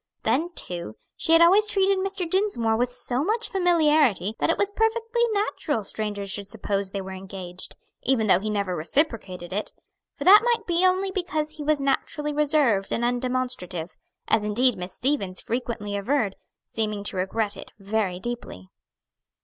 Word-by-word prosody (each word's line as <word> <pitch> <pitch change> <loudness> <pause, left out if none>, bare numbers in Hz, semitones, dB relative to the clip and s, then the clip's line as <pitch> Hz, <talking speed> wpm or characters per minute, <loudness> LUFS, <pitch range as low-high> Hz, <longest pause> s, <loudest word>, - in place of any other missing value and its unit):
Then, 330 +5 +1
too, 170 -11 -5 0.2
she 325 - +2
had 330 +1 +8
always 395 +5 +5
treated 390 -1 +2
Mr. 385 -2 -1
Dinsmore 330 - +1
with 245 +2 0
so 245 +2 -1
much 445 +6 0
familiarity 305 - +3
that - - +1
it 330 - +2
was 405 0 0
perfectly 455 +1 0
natural 400 - -1
strangers 205 -1 -3
should 200 0 -3
suppose 200 -2 -2
they 195 0 -4
were 190 0 -7
engaged, 185 -1 -7 0.3
even 250 -4 +2
though 190 -3 +5
he 215 +2 -3
never 200 -3 -1
reciprocated 185 - -2
it; 210 +2 -3 0.4
for - - -5
that 410 +3 +9
might 475 -1 +1
be 345 +1 +1
only 375 +1 +2
because 315 -5 -2
he 300 - -5
was 300 0 +2
naturally 295 +2 -1
reserved 285 -9 +2
and 235 - -1
undemonstrative; 245 -9 -2 0.3
as 220 -1 +2
indeed 240 +4 +2
Miss 180 +1 -7
Stevens 240 -9 -1
frequently 230 -4 -3
averred, 210 0 0 0.3
seeming 215 -2 -3
to 205 - -2
regret 205 +3 -1
it 195 - -11
very 200 -3 -1
deeply. 185 - -6
240 Hz, 165 wpm, -25 LUFS, 200-330 Hz, 0.4 s, that